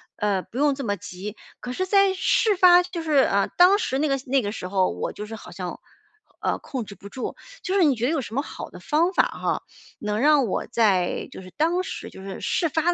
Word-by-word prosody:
呃， 205 -2 0
不 240 - -11
用 285 0 +3
这 275 - -5
么 205 -2 0
急。 200 +2 -8 0.2
可 250 - -6
是 370 - -1
在 395 0 +4
事 410 +3 +2
发 360 -1 +7
就 350 -1 -5
是， 315 - -3
呃， 200 -7 +3
当 365 +3 +7
时 265 -10 -1
那 305 - +2
个 275 -1 +1
那 270 +1 +3
个 205 -2 -3
时 180 - -5
候 190 -1 +2
我 - - -3
就 210 - -6
是 225 +1 -7
好 220 - -11
像， - - -6 0.6
呃， - - 0
控 255 -5 -5
制 200 - -10
不 200 - -12
住， 255 - -5 0.3
就 380 -3 -2
是 390 - +5
你 290 -5 +4
觉 230 +1 -1
得 270 - +1
有 320 -4 0
什 225 -2 -8
么 275 - +2
好 - - -8
的 - - -12
方 335 +5 +1
法 - - +4
哈， - - -2 0.4
能 210 0 -2
让 290 0 +4
我 - - -2
在 200 -7 +1
就 - - -9
是 185 0 -12
当 335 +4 +2
时 - - -6
就 - - -11
是 195 0 -7
事 335 -3 0
发 325 +4 +1
270 Hz, 265 characters per minute, -24 LUFS, 210-345 Hz, 0.6 s, 发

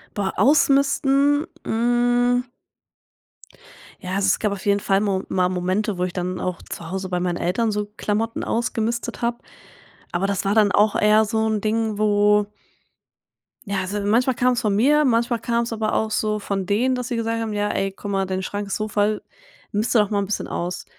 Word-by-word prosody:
Boah, 200 -2 -1
Ausmisten? 280 +1 +3 0.2
Hm 245 +1 +2 1.6
ja, 185 -2 -7
also 195 0 +1
es 190 - +2
gab 210 - 0
auf 200 -1 -6
jeden 200 0 +3
Fall 195 0 +1
mo 195 -2 0
mal 180 -1 +1
Momente, 185 +2 -1
wo 180 - -1
ich 180 -1 -2
dann 180 0 -3
auch 180 -2 -3
zu 165 - -7
Hause 190 0 -4
bei 180 - -1
meinen 175 -1 -1
Eltern 210 +6 0
so 210 0 -2
Klamotten 225 +2 -2
ausgemistet 235 +1 -2
habe. 235 0 0 0.7
Aber 180 +3 0
das 200 0 -2
war 200 - +1
dann 210 -3 +4
auch 210 0 +3
eher 215 +1 +4
so 220 +1 0
'n 215 -1 0
Ding, 220 0 -1
wo 210 0 +3 1.2
ja, 200 -1 0
also 200 +3 -3
manchmal 235 +6 +2
kam's 245 0 +1
von 210 -3 +1
mir, 290 +8 +4
manchmal 235 -2 +1
kam's 235 0 -1
aber 215 -1 -1
auch 220 - 0
so 215 0 -1
von 195 -2 -3
denen, 240 +7 +1
dass 250 +1 -4
sie 240 - -2
gesagt 230 0 -1
haben: 225 -1 -3
„Ja 205 0 -1
ey, 195 0 -1
gucke 195 - -9
mal, 195 -1 0
dein 185 0 -3
Schrank 205 +2 -4
ist 195 - -2
so 215 0 -2
voll, 210 0 0 0.5
miste 220 +3 +1
doch 210 - +2
mal 205 - 0
'n 200 - -1
bisschen 200 +1 -3
aus“. 180 +1 -4
210 Hz, 195 wpm, -22 LUFS, 195-235 Hz, 1.6 s, dann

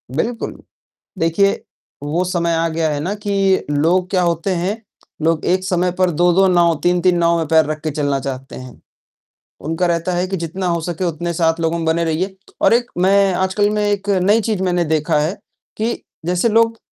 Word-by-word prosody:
बिल्कुल। 230 +8 -3 0.6
देखिए, 165 +5 +2 0.4
वो 160 +5 0
समय 170 -2 0
आ 165 0 +1
गया 160 -1 -1
है 145 - -2
ना 175 +7 -2
कि 195 -2 +1
लोग 175 +6 +1
क्या 185 - +1
होते 170 +2 0
हैं, 195 +6 -2 0.4
लोग 160 0 +1
एक 185 +1 +1
समय 180 -1 0
पर 185 -1 +3
2-2 175 +4 +3
नाव, 175 -2 +3
3-3 180 0 +2
नाव 170 0 +2
में 160 - -2
पैर 160 -1 +4
रख 155 0 -4
के 155 - -1
चलना 145 -2 -1
चाहते 135 -1 -6
हैं। 130 -1 -11 0.9
उनका 165 +2 0
रहता 170 +1 0
है 180 +1 0
कि 195 - -2
जितना 175 +2 -4
हो 170 -1 0
सके 175 +2 -4
उतने 170 0 -2
साथ 165 0 +1
लोगों 165 +1 0
में 165 - -3
बने 165 +1 +1
रहिए। 180 +5 -2 0.2
और - - +4
एक 240 +1 0
मैं 195 +1 +3
आजकल 190 +3 +1
में 210 0 0
एक 205 0 -1
नई 210 +5 +4
चीज़ 210 -3 -2
मैंने 175 -2 +1
देखा 155 -1 +1
है 160 +6 -1 0.4
कि 230 +2 -2 0.2
जैसे 180 +5 +1
लोग 225 +1 +2
175 Hz, 195 wpm, -18 LUFS, 165-190 Hz, 0.9 s, पैर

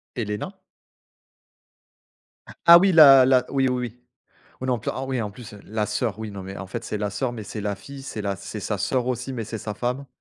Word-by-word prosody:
Helaena? 110 - -4 2.1
Ah 170 0 +11
oui 190 +2 +4
la 140 -5 +9
la 130 -1 +4
oui, 135 -1 +2
oui, 125 - 0
oui. 120 +3 -24 0.6
On - - -3
est - - 0
en 120 - 0
plein 110 - -3
oh 135 - -4
oui, 130 -3 -1
en 105 - -3
plus 105 +1 -12
la 105 0 -2
sœur 105 0 -2
oui 110 -2 -6
non 100 -1 -7
mais 95 +1 -8
en 95 - -6
fait, 95 - -6
c'est 105 - -4
la 105 0 -2
sœur, 120 +5 -2
mais 110 -3 -7
c'est 105 +1 -6
la 100 0 -2
fille, 135 +8 -11
c'est 125 -5 -6
la 100 -1 -2
c'est 100 +2 -8
sa 105 +1 -3
sœur 125 +5 0
aussi, 125 +1 -3
mais 115 -3 -4
c'est 110 0 -6
sa 105 - -5
femme. 125 +3 -3
115 Hz, 235 wpm, -24 LUFS, 105-130 Hz, 2.1 s, Ah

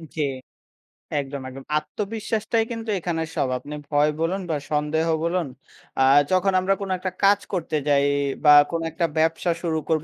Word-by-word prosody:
জি 155 - -1 1.0
একদম, 140 0 -5
একদম। 135 +1 -10
আত্মবিশ্বাসটাই 220 +6 -2
কিন্তু 230 -1 -5
এখানে 165 -1 -2
সব - - +1
আপনি 145 +3 -8
ভয় 145 0 +3
বলুন 175 +4 0
বা 155 - +1 0.2
সন্দেহ 150 +2 0 0.2
বলুন 170 -1 0 0.5
আ - - +3 0.3
যখন 185 +1 +3
আমরা 190 +1 +2
কোনো 195 - -3
একটা 185 +1 -4
কাজ 200 0 +5
করতে 165 -3 -2
যাই 140 -1 +4 0.4
বা 150 - +6 0.2
কোনো 165 -1 -2
একটা 170 +2 0
ব্যবসা 165 +2 +1
শুরু 165 -2 -1
করব 155 -1 +1
165 Hz, 160 wpm, -23 LUFS, 150-190 Hz, 1.0 s, বা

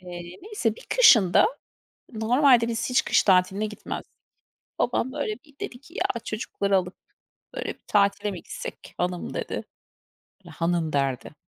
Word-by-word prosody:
Eee, 175 -1 -9
neyse 410 - -1
bir - - -14
kışın 225 - +7
da - - +7 0.7
normalde 235 +2 +4
biz 230 +2 -2
hiç 250 - +4
kış - - +3
tatiline 190 +2 +3
gitmezdik. 210 0 -7 0.7
Babam, 245 +1 0
böyle, 285 -7 -2
bir 290 -2 -23
dedi 245 - -6
ki, 325 +5 -18
"Ya 235 - 0
çocukları 200 -2 -1
alıp, 180 0 -3 0.6
böyle, - - -4
bir - - -7
tatile 200 0 +2
mi 185 - -6
gitsek, - - -8
hanım?" 180 0 -2
dedi. - - -4 0.9
Hanım 165 -2 -1
derdi. 135 0 -1
210 Hz, 145 wpm, -25 LUFS, 180-245 Hz, 0.9 s, kışın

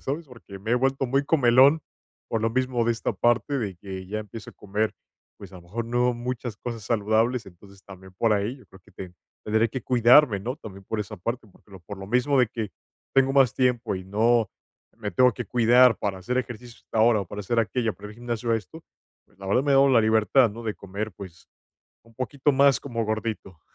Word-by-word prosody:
¿sabes?, 150 +4 -4
porque 105 -6 -12
me 110 +3 -5
he - - +4
vuelto 135 +1 0
muy 135 +3 +1
comelón, 140 +1 +4 0.5
por 115 - -1
lo 115 +1 0
mismo 125 -1 0
de 120 - +2
esta 115 - -3
parte, 120 +4 +1
de 100 -6 -3
que 95 0 -8
ya 105 +2 -4
empiezo 105 +1 -10
a - - -21
comer, 105 +2 -2 0.4
pues, 100 -2 -12
a 95 - -10
lo 90 - -13
mejor 110 +7 -5
no 120 +1 +1
muchas 120 -2 -5
cosas 115 -4 -7
saludables, 110 +2 0
entonces 95 +2 -16
también 95 -1 -13
por 115 +1 +2
ahí, 105 +6 -1
yo - - -18
creo 95 - -17
que - - -23
ten 90 -2 -10 0.3
tandré 110 +2 +2
que 130 0 -6
cuidarme, 125 -1 +5
¿no?, 120 +6 -4
también 100 -7 -12
por 110 - -3
esa 105 +1 -6
parte, 115 +4 -5
porque 100 - -25
lo 95 - -11
por 100 +3 -9
lo 95 - -8
mismo 125 +5 +1
de 125 - +5
que, 110 -2 -5 0.4
tengo 135 0 +3
más 135 -4 +4
tiempo 125 -5 0
y 95 - -8
no 110 +2 +2 0.5
me 105 -3 -5
tengo 125 -1 +4
que - - -6
cuidar 120 0 +4
para 100 -2 -3
hacer 125 +8 -2
ejercicio 120 -1 -6
hasta 110 - -4
ahora, 110 -1 +4
o - - -11
para 105 +4 -7
hacer 115 +4 -1
aquello, 115 +1 0
para 105 +1 -11
el - - -12
gimnasio 120 0 -2
esto, 115 - -7 0.4
pues, - - -30
la 95 0 -10
verdad, 125 +7 +2
me 145 - +2
he - - +5
dado 135 +1 +5
la 125 -4 +5
libertad, 110 +3 +3
¿no?, 115 +3 -9
de 110 -2 -3
comer, 100 +3 -6
pues, 90 -3 -12 0.6
un 115 0 -22
poquito 135 +3 -1
más 140 -1 +4
como 115 -4 -3
gordito. 110 -5 -4
115 Hz, 225 wpm, -25 LUFS, 100-125 Hz, 0.6 s, cuidarme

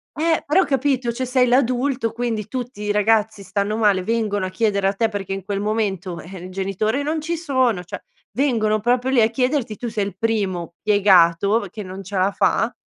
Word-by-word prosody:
Eh! 325 +1 +1
Però 345 +7 +4
capito, 265 -3 0
cioè 255 +2 -3
sei 250 0 +3
l'adulto 250 -1 +1
quindi 230 -3 -3
tutti 245 -2 -6
i 210 0 -1
ragazzi 210 0 +1
stanno 200 +2 -2
male, 205 -4 +2
vengono 210 -2 -1
a - - -5
chiedere 200 0 0
a 195 - +1
te 225 +3 +1
perché 200 -3 -4
in 195 -1 -5
quel 200 -1 -2
momento, 200 -5 -2
eh, 185 +3 -10
il - - -8
genitore 195 +7 -1
non 310 +2 -2
ci 335 +2 -2
sono 260 - 0
cioè 175 - -8 0.3
vengono 220 -3 +1
proprio 245 +3 +1
lì 255 -3 +4
a 220 - +4
chiederti, 250 -2 -1
tu 245 - -5
sei 210 -2 -1
il 195 -2 -7
primo 190 -6 -1
piegato 200 0 +4
che 215 - -7
non 190 +1 -8
ce 200 +2 -8
la 190 +2 +2
fa, - - +1
215 Hz, 200 wpm, -21 LUFS, 195-250 Hz, 0.3 s, Però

